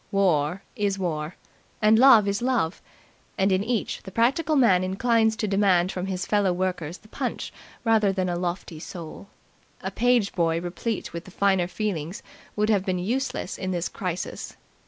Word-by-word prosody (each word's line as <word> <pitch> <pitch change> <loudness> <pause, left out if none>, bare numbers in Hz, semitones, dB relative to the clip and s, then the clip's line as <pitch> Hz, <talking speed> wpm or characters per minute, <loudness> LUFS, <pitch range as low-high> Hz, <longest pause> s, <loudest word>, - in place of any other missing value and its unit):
War 180 -2 +1
is 205 -4 0
war, 160 -3 -3 0.4
and 215 +1 +5
love 235 -6 +7
is 200 +1 0
love, 240 -9 0 0.6
and 195 +1 +2
in 190 +1 +2
each 230 0 -2
the - - -9
practical 275 - +2
man 205 -10 +4
inclines 220 +4 +2
to 215 - -2
demand 190 -3 +3
from 185 +1 -4
his 185 -2 -3
fellow 205 -3 +2
workers 180 -2 -2
the 215 - -20
punch - - -4 0.3
rather 220 -3 +3
than 185 -1 -1
a 175 - -1
lofty 175 -2 -4
soul. 170 +2 -9 0.5
A - - -4
page 245 -4 +2
boy 165 -2 +1
replete 180 +5 -4
with 170 0 -6
the - - -11
finer 190 -1 +2
feelings 185 -4 -3 0.3
would 210 +1 +2
have 200 -3 +2
been 185 -1 -1
useless 230 +2 -2
in 185 - -3
this 175 -2 -1
crisis. 180 -2 -5
195 Hz, 170 wpm, -25 LUFS, 180-215 Hz, 0.6 s, love